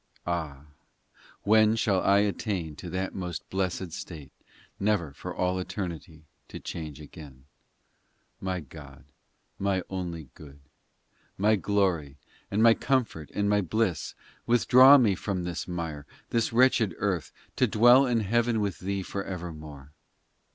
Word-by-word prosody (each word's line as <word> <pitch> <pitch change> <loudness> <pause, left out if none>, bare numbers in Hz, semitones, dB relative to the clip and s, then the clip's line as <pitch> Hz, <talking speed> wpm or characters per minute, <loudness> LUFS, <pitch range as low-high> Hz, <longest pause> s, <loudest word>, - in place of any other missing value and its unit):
Ah, 80 -5 -4 0.8
when 110 +1 +4
shall 100 -5 +1
I 100 +1 +4
attain 95 -6 -2
To 90 - -8
that 95 +2 -3
most 90 -3 -5
blessed 95 -2 -2
state, 80 -3 -8 0.5
Never 100 -8 0
for - - -7
all 90 0 0
eternity 85 -4 -6 0.2
to - - -8
change 75 -3 -7
again? 70 -3 -12
XIII 65 -1 -42
My 95 -1 -2
God, 70 -2 -13 0.5
my 95 -2 0
only 85 -6 -5
good, 70 -1 -14 0.8
My 105 +3 +3
glory, 90 -8 0 0.3
and 105 +3 +1
my 115 -1 +8
comfort 115 - -1
and 100 0 +1
my 105 0 +3
bliss, 95 -2 -1 0.3
Withdraw 130 +3 +7
me 115 -7 +3
from 95 -1 -3
this 85 -1 -4
mire, 80 -5 -5 0.2
This 115 -1 +1
wretched 115 -6 +3
earth, 95 -5 -2 0.3
To - - +3
dwell 120 +5 +6
in 120 -2 +1
heaven 115 +2 +1
with 100 -3 -2
Thee 100 +1 -3
for 100 +1 -4
evermore 80 -6 -8
95 Hz, 135 wpm, -27 LUFS, 80-105 Hz, 0.8 s, my